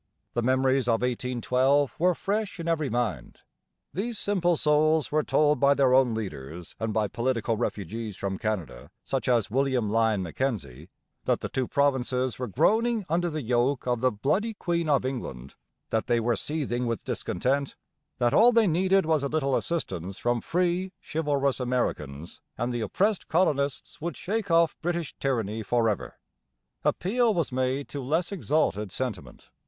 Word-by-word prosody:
The 120 Hz, -, 0 dB
memories 130 Hz, +1 st, +2 dB
of 115 Hz, 0 st, +2 dB
1812 125 Hz, +2 st, +1 dB
were 180 Hz, +1 st, +3 dB
fresh 205 Hz, 0 st, -2 dB
in 170 Hz, -, -4 dB
every 155 Hz, -4 st, 0 dB
mind. 110 Hz, -, -3 dB, 0.5 s
These 220 Hz, +5 st, -3 dB
simple 175 Hz, -5 st, +1 dB
souls 155 Hz, +1 st, +3 dB
were 155 Hz, +1 st, +3 dB
told 150 Hz, 0 st, +2 dB
by 140 Hz, 0 st, +5 dB
their 135 Hz, -2 st, +3 dB
own 130 Hz, -3 st, +4 dB
leaders 85 Hz, -5 st, -6 dB
and 110 Hz, 0 st, -1 dB
by 110 Hz, 0 st, +1 dB
political 115 Hz, 0 st, -1 dB
refugees 110 Hz, -1 st, -4 dB
from 95 Hz, -1 st, -3 dB
Canada, 90 Hz, -, -3 dB, 0.2 s
such 135 Hz, -4 st, -2 dB
as 115 Hz, -4 st, +2 dB
William 130 Hz, -4 st, +1 dB
Lyon 110 Hz, -3 st, +2 dB
Mackenzie, 85 Hz, -, -3 dB, 0.4 s
that -, -, +1 dB
the -, -, -4 dB
two 130 Hz, -2 st, -1 dB
provinces 130 Hz, -3 st, +1 dB
were 125 Hz, -, -2 dB
groaning 220 Hz, -, +2 dB
under 175 Hz, +2 st, +1 dB
the 155 Hz, -2 st, -4 dB
yoke 125 Hz, +3 st, +1 dB
of 120 Hz, -2 st, 0 dB
the 130 Hz, 0 st, +3 dB
'bloody 190 Hz, -, 0 dB
Queen 170 Hz, -4 st, -1 dB
of 140 Hz, -3 st, +3 dB
England,' 70 Hz, -, -5 dB, 0.4 s
that 110 Hz, -, 0 dB
they 120 Hz, -, +3 dB
were 115 Hz, +1 st, +1 dB
seething 125 Hz, -5 st, -2 dB
with 115 Hz, -4 st, -3 dB
discontent, 135 Hz, +9 st, -1 dB, 0.4 s
that 120 Hz, -2 st, +2 dB
all 240 Hz, +3 st, +7 dB
they 230 Hz, -2 st, +4 dB
needed 190 Hz, +2 st, +3 dB
was 155 Hz, -2 st, +2 dB
a 140 Hz, -, 0 dB
little 140 Hz, -3 st, +1 dB
assistance 95 Hz, -, -3 dB
from 120 Hz, -1 st, 0 dB
free, 180 Hz, +2 st, 0 dB
chivalrous 145 Hz, -4 st, 0 dB
Americans 85 Hz, -, -3 dB, 0.2 s
and 120 Hz, +1 st, -1 dB
the 120 Hz, -, -2 dB
oppressed 195 Hz, -, 0 dB
colonists 145 Hz, -6 st, 0 dB
would 170 Hz, -2 st, -4 dB
shake 210 Hz, +1 st, -2 dB
off 165 Hz, 0 st, +4 dB
British 170 Hz, -2 st, -2 dB
tyranny 115 Hz, -5 st, -1 dB
for 115 Hz, +2 st, +1 dB
ever. 105 Hz, -3 st, -2 dB, 0.7 s
Appeal 225 Hz, +3 st, +2 dB
was 165 Hz, -6 st, 0 dB
made 130 Hz, +2 st, -1 dB
to 140 Hz, -, -5 dB
less 160 Hz, +8 st, 0 dB
exalted 145 Hz, -, 0 dB
sentiment. 95 Hz, -, -6 dB
130 Hz, 160 wpm, -27 LUFS, 115-160 Hz, 0.7 s, all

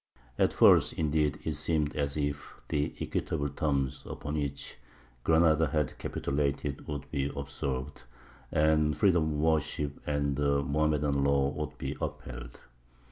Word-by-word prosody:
At -, -, +4 dB
first, -, -, +6 dB
indeed, 75 Hz, -1 st, +1 dB
it 80 Hz, -, -1 dB
seemed 75 Hz, 0 st, 0 dB
as 70 Hz, 0 st, -1 dB
if 70 Hz, -1 st, -3 dB
the 75 Hz, 0 st, -1 dB
equitable 70 Hz, 0 st, -2 dB
terms 70 Hz, -3 st, -1 dB
upon 75 Hz, -, -5 dB
which 70 Hz, -2 st, -4 dB, 0.5 s
Granada 80 Hz, -1 st, +4 dB
had 75 Hz, -4 st, -1 dB
capitulated 70 Hz, 0 st, -2 dB
would 70 Hz, -1 st, -5 dB
be 70 Hz, -1 st, -1 dB
observed, 70 Hz, -2 st, -4 dB, 0.5 s
and 75 Hz, -1 st, +3 dB
freedom 90 Hz, -6 st, +4 dB
of -, -, -2 dB
worship 75 Hz, -2 st, 0 dB
and 70 Hz, -2 st, 0 dB
the 70 Hz, -1 st, +2 dB
Mohammedan 75 Hz, -1 st, +1 dB
law 70 Hz, -1 st, +3 dB
would 75 Hz, +1 st, -5 dB
be -, -, -4 dB
upheld. -, -, -6 dB
75 Hz, 135 wpm, -30 LUFS, 70-75 Hz, 0.5 s, first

